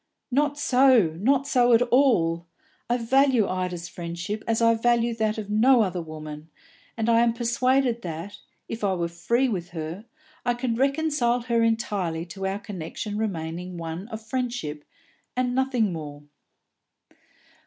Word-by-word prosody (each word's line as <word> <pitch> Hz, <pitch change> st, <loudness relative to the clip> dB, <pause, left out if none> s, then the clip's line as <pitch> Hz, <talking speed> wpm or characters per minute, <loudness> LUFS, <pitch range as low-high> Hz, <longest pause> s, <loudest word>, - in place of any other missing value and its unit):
"Not 290 Hz, +2 st, +1 dB
so, 250 Hz, -, +4 dB
not 270 Hz, +6 st, +2 dB
so 245 Hz, -3 st, +3 dB
at 230 Hz, -, +5 dB
all! 215 Hz, -11 st, +2 dB, 0.4 s
I 240 Hz, -, +2 dB
value 250 Hz, -2 st, +3 dB
Ida's 180 Hz, -2 st, -3 dB
friendship 175 Hz, +5 st, -5 dB
as 225 Hz, -1 st, +1 dB
I 230 Hz, 0 st, +5 dB
value 235 Hz, +1 st, +2 dB
that 220 Hz, -1 st, 0 dB
of 210 Hz, -1 st, -5 dB
no 235 Hz, +3 st, +5 dB
other 180 Hz, -3 st, -2 dB
woman, 155 Hz, -1 st, -8 dB, 0.5 s
and 225 Hz, 0 st, -1 dB
I 230 Hz, 0 st, +5 dB
am 235 Hz, -1 st, +3 dB
persuaded 240 Hz, +1 st, +1 dB
that, 170 Hz, +2 st, -6 dB, 0.3 s
if 225 Hz, -1 st, -6 dB
I 195 Hz, -2 st, +2 dB
were 170 Hz, -1 st, -1 dB
free 235 Hz, +10 st, 0 dB
with 180 Hz, -7 st, -3 dB
her, 165 Hz, +7 st, -5 dB, 0.4 s
I 245 Hz, -1 st, +1 dB
could 240 Hz, -1 st, -2 dB
reconcile 275 Hz, -3 st, +1 dB
her 235 Hz, -1 st, +1 dB
entirely 205 Hz, -8 st, 0 dB
to 195 Hz, +2 st, -4 dB
our 195 Hz, +1 st, -2 dB
connection 205 Hz, +1 st, -6 dB
remaining 180 Hz, -4 st, -4 dB
one 165 Hz, +4 st, -5 dB
of 220 Hz, -1 st, -7 dB
friendship, 235 Hz, -, -3 dB, 0.5 s
and 250 Hz, -1 st, +1 dB
nothing 250 Hz, -6 st, +1 dB
more." 145 Hz, -2 st, -7 dB
220 Hz, 150 wpm, -25 LUFS, 175-245 Hz, 0.5 s, at